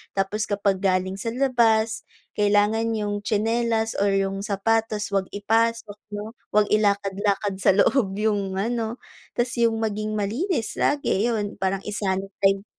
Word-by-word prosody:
Tapos 200 +2 -1
kapag 200 -2 0
galing 190 0 0
sa 230 - -5
labas 230 -4 +2 0.3
kailangan 210 +2 +2
yung 205 -1 -2
tsinelas, 225 +1 0
or 200 0 +1
yung 195 0 0
sapatos, 215 +1 0
'wag 195 -1 0
ipasok 225 +1 0 0.2
'no, 210 +2 -6 0.2
'wag 210 0 +3
ilakad-lakad 200 -1 +1
sa - - +4
loob 200 -3 +2
yung 205 -3 0
ano, 230 +3 -2 0.4
tas 240 0 0
yung 230 -1 +3
maging 215 -1 -2
malinis 230 - -1
lagi 240 -6 +1
yun 210 -3 -2
parang 190 0 -1
i-sanitize 195 -1 0
210 Hz, 130 wpm, -24 LUFS, 195-225 Hz, 0.4 s, sa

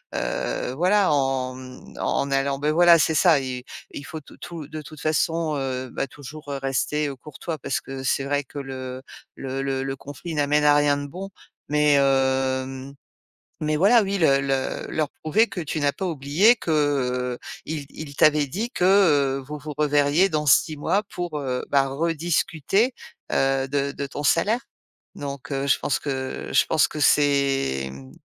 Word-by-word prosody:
heu, 125 - -2
voilà, 185 +3 +3
en, 135 -2 0
hem, 130 -1 -12
en - - 0
en 140 - -3
allant, 135 0 0
beh 150 +1 0
voilà, 170 +1 +6
c'est 160 +1 +2
ça 160 -1 +5
i 125 -1 -5 0.3
il 145 - -8
faut 160 +2 -7
tout - - -17
tout 165 -4 -8
de 155 +1 -7
toute 155 0 -11
façon, 155 +1 0
heu, 130 -1 -3
bah - - -2
toujours, 145 +2 -10
heu, 140 - -3
rester, 140 +3 0
heu, 140 - -5
courtois 150 +4 -7
parce - - -2
que 135 0 -7
c'est 135 +1 0
vrai 145 +1 0
que 145 +2 -9
le 130 -1 -6 0.3
le 135 0 -4
le 135 -1 -1
le 135 0 -3
conflit 145 +5 -8
n'amène 150 0 +2
à 145 0 +6
rien 145 -1 +3
de 145 0 -5
bon 185 +7 -7 0.4
mais 150 0 +3
hem, 135 -1 +1 0.7
mais 155 0 0
voilà, 210 +8 +5
oui, 200 0 -1
le 140 -5 +4
le 135 -1 -2
leur 155 -2 -1
prouver 210 +9 +3
que 180 - -5
tu 155 -1 -3
n'as 145 -1 +2
pas 190 - -4
oublié 165 - +3
que, 175 - -5
heu, 125 -5 0 0.3
ils 155 -2 -4
ils 145 -2 -9
t'avaient 150 -1 +4
dit 210 - -3
que, 180 - -1
heu, 145 -9 +4
vous 150 +1 -6
vous 150 +1 -7
reverriez 150 +4 +3
dans 150 -2 -1
6 155 +2 +4
mois 195 +7 +1
pour, 175 -4 -4
heu, 130 -2 -2
bah 135 -1 +3
rediscuter, 165 - 0 0.4
heu, 135 0 +2
de 140 0 0
de 140 - -4
ton 140 +1 -6
salaire 205 +10 +2 0.6
donc, 140 0 -6
heu, 135 0 -1
je 140 - +4
pense 140 - 0
que 130 -2 -4
je - - +5
pense 155 - +3
que 155 - -6
c'est, 140 - +2
hem, 65 0 -10
145 Hz, 185 wpm, -24 LUFS, 135-155 Hz, 0.7 s, voilà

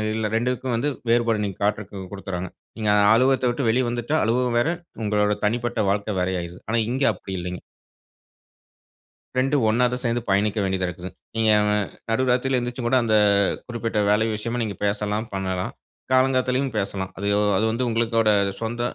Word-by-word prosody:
இல்ல, 110 -1 -1
ரெண்டுக்கும் 125 +2 -1
வந்து 130 +6 0 0.2
வேறுபாடு 115 -2 +2
நீங்க 100 -2 -4
காட்டறதுக்கு 105 -1 -2
கொடுக்குறாங்க. 95 -2 -5 0.3
நீங்க 110 -2 0 0.2
அலுவகத்த 130 +2 +3
விட்டு 120 +3 -2
வெளியே 125 +3 +2
வந்துட்டா 120 +5 -2
அலுவலகம் 120 +2 +1
வேற, 120 - +2 0.3
உங்களோட 105 0 +2
தனிப்பட்ட 120 +2 -1
வாழ்க்கை, 105 +1 -1
வேற 90 0 0
ஆயிடுது. 85 +1 -8
ஆனா 115 - +1
இங்கே 135 +3 +1
அப்படி 95 0 -8
இல்லீங்க. 90 +1 -5 1.8
2ம், 135 0 +2
ஒண்ணா 120 +3 +3
தான் 125 - -3
சேர்ந்து 120 0 0
பயணிக்க 105 +2 +2
வேண்டியதா 95 -1 0
இருக்குது. 90 +1 -7 0.3
நீங்க 110 -1 +3 0.6
நடு 130 +4 +1
ராத்திரியில 130 +1 +1
எந்திரிச்சு 125 +1 -4
கூட 130 - +3
அந்த 110 -2 +2 0.5
குறிப்பிட்ட 115 -3 -2
வேல 105 +2 +3
விஷயமா 115 +3 -3
நீங்க 105 -3 -4
பேசலாம், 105 +2 -1
பண்ணலாம். 95 -1 -2 0.4
காலங்காத்தாலயும் 130 0 +2
பேசலாம். 95 -2 -3
அது 100 +1 -3 0.3
அது 110 - +2
வந்து 120 +2 -1
உங்களோட 115 -1 +1 0.3
சொந்த 120 +1 -3
115 Hz, 155 wpm, -23 LUFS, 100-125 Hz, 1.8 s, அலுவகத்த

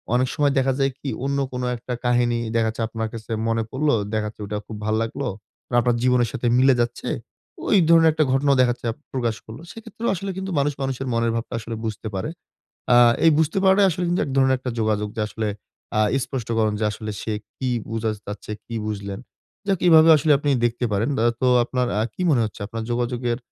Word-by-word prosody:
অনেক 130 +1 +2
সময় 145 -2 +2
দেখা 135 0 +2
যায় 135 0 +2
কি? 140 - -4 0.2
অন্য 140 0 0
কোন 125 0 -4 0.2
একটা 125 +1 -6
কাহিনী 120 -1 +2 0.2
দেখা 115 -1 +2
যাচ্ছে 115 +1 -3
আপনার 110 -1 -3
কাছে 115 0 -8 0.2
মনে 115 0 +1
পড়লো, 145 +1 +1 0.2
দেখা 110 -1 0
যাচ্ছে 105 0 -10
ওটা 105 +1 -3
খুব 110 - -7
ভাল 110 - +1
লাগলো। 130 +4 -3 0.4
মার 120 - +1
আপনার 120 0 +2
জীবনের 125 -2 +3
সাথে 120 - -2
মিলে 135 0 +6
যাচ্ছে। 120 0 -3 0.6
ঐ - - -4 0.2
ধরনের 165 -1 +7
একটা 155 0 +2
ঘটনাও 140 +1 +3
দেখা 125 - +4
যাচ্ছে 120 - -7 0.3
প্রকাশ 120 -4 -1
করল। 110 +4 -10
সেক্ষেত্রেও 225 +1 -5
আসলে 195 +2 -4
কিন্তু 190 0 -4
মানুষ 145 +1 +1
মানুষের 135 0 -2
মনের 115 0 +1
ভাবটা 115 - -4
আসলে 115 +1 -6
বুঝতে 110 0 -4
পারে। 95 +11 -2 0.7
আ - - +7 0.3
এই 165 - +8
বুঝতে 160 +4 +1
পারাটাই 195 +1 +5
আসলে 175 +2 -2
কিন্তু 175 +1 +1
১ 140 - -5
ধরনের 130 -1 +4
একটা 130 0 -4
যোগাযোগ। 105 -1 0
যে - - -2
আসলে 110 0 -3 0.5
আ - - +4 0.2
স্পষ্টকরণ 115 -4 -1
যে - - +1
আসলে 110 +1 -6
সে 110 - -3 0.2
কি 130 - -2 0.2
বুঝাত 110 -1 -1
চাচ্ছে? 105 +1 -6
কি 115 - -7
বুঝলেন? 100 -1 -4 0.5
যাক 195 -3 +1
এভাবে 160 -1 +8
আসলে 150 +1 +3
আপনি 145 0 0
দেখতে 120 +1 0
পারেন। 105 +5 +1
দা - - +2 0.2
তো - - +4 0.2
আপনার 125 0 -1
আ - - +2
কি 185 - -4
মনে 130 - +3
হচ্ছে 110 0 -7
আপনার 115 +2 -5
যোগাযোগের 120 0 -1
120 Hz, 210 wpm, -23 LUFS, 110-140 Hz, 0.7 s, এই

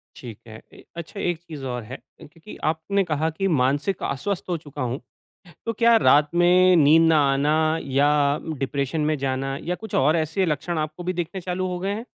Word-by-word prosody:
ठीक 115 -4 -10
है। 110 0 -11
ए - - -15
अच्छा 170 +4 -8
एक 175 -4 -1
चीज़ 150 -5 -8
और 125 -2 -4
है, 125 +5 -8 0.2
क्योंकि 165 +7 -13 0.2
आपने 195 +5 -1
कहा 160 -2 -1
कि 180 +5 -2
मानसिक 145 +9 0
अस्वस्थ 180 +8 -2
हो 175 - 0
चुका 145 -4 -9
हूँ, 125 +2 -2 0.7
तो 230 - -1
क्या 230 +2 +4
रात 150 -8 +4
में 180 +1 +5
नींद 160 +1 +5
ना 160 -1 +4 0.2
आना 145 +2 +1 0.5
या 145 - +4 0.5
डिप्रेशन 140 +3 -2
में 155 - 0
जाना 135 0 -2
या 180 - -2
कुछ 220 +4 -7
और 150 +4 +3
ऐसे 160 +4 0
लक्षण 165 +2 -2
आपको 155 +3 -4
भी 180 +1 -2
दिखने 175 +2 -4
चालू 180 +1 -3
हो 180 -1 -4
गए 195 +2 -2
हैं? 225 +3 -6
160 Hz, 195 wpm, -23 LUFS, 140-180 Hz, 0.7 s, में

